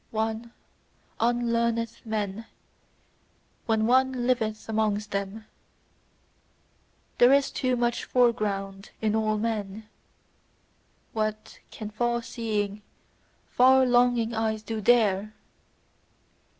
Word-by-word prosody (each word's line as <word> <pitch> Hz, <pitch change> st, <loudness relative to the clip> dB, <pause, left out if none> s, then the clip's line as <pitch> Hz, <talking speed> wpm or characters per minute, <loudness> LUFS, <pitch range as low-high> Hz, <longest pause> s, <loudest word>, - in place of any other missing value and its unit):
One 220 Hz, +1 st, -3 dB, 0.7 s
unlearneth 235 Hz, -1 st, 0 dB
men 215 Hz, 0 st, -3 dB, 1.2 s
when 220 Hz, -1 st, +2 dB
one 255 Hz, 0 st, +2 dB
liveth 220 Hz, -4 st, -1 dB
amongst 215 Hz, -1 st, -1 dB
them: 200 Hz, +2 st, -4 dB, 1.7 s
there 245 Hz, +1 st, +7 dB
is 280 Hz, 0 st, +3 dB
too 255 Hz, -2 st, 0 dB
much 240 Hz, 0 st, 0 dB
foreground 205 Hz, -5 st, 0 dB
in 215 Hz, -1 st, 0 dB
all 215 Hz, -1 st, +1 dB
men 210 Hz, -1 st, -3 dB, 1.3 s
what 215 Hz, -1 st, -3 dB
can 215 Hz, -1 st, -8 dB
far 235 Hz, +2 st, -1 dB
seeing, 210 Hz, -3 st, -3 dB, 0.7 s
far 260 Hz, +1 st, +5 dB
longing 245 Hz, -2 st, +2 dB
eyes 220 Hz, -1 st, -1 dB
do 220 Hz, 0 st, -4 dB
THERE! 215 Hz, -2 st, +2 dB
220 Hz, 90 wpm, -26 LUFS, 215-240 Hz, 1.7 s, there